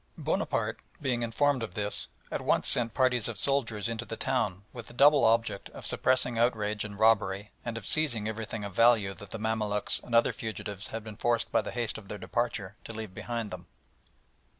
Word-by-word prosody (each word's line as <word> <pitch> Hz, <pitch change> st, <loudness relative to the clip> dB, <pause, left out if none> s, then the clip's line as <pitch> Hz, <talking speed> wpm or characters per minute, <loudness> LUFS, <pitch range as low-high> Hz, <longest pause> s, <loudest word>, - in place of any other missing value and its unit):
Bonaparte -, -, -1 dB, 0.2 s
being 125 Hz, -4 st, -1 dB
informed 130 Hz, +4 st, +1 dB
of 115 Hz, -, -5 dB
this, 105 Hz, -1 st, -1 dB, 0.2 s
at -, -, -2 dB
once -, -, +2 dB
sent 115 Hz, -2 st, +4 dB
parties 130 Hz, -4 st, +2 dB
of 115 Hz, -3 st, -5 dB
soldiers 115 Hz, -3 st, +1 dB
into 115 Hz, 0 st, -3 dB
the 115 Hz, -1 st, -6 dB
town 105 Hz, -8 st, -1 dB
with 120 Hz, -3 st, -8 dB
the -, -, -12 dB
double 145 Hz, +3 st, +6 dB
object 115 Hz, -3 st, +2 dB
of -, -, -8 dB
suppressing 125 Hz, -2 st, +2 dB
outrage 110 Hz, -3 st, +1 dB
and 105 Hz, -1 st, -7 dB
robbery 105 Hz, -2 st, +2 dB
and 115 Hz, -1 st, -4 dB
of 110 Hz, -, -7 dB
seizing 120 Hz, -9 st, +1 dB
everything 110 Hz, -1 st, -4 dB
of 100 Hz, -1 st, -6 dB
value 115 Hz, -3 st, +4 dB
that 100 Hz, +2 st, -12 dB
the -, -, -5 dB
Mamaluks 105 Hz, -1 st, 0 dB
and 120 Hz, -, -3 dB
other 115 Hz, -, +5 dB
fugitives 105 Hz, -3 st, -4 dB
had 115 Hz, -1 st, -5 dB
been 110 Hz, -1 st, -9 dB
forced 120 Hz, -1 st, 0 dB
by -, -, +3 dB
the -, -, -6 dB
haste 120 Hz, -3 st, -2 dB
of 100 Hz, -, -15 dB
their 105 Hz, -, -5 dB
departure 105 Hz, -4 st, -2 dB
to -, -, -8 dB
leave 110 Hz, -3 st, -6 dB
behind 115 Hz, +1 st, -4 dB
them. 90 Hz, -1 st, -8 dB
115 Hz, 195 wpm, -29 LUFS, 105-120 Hz, 0.2 s, double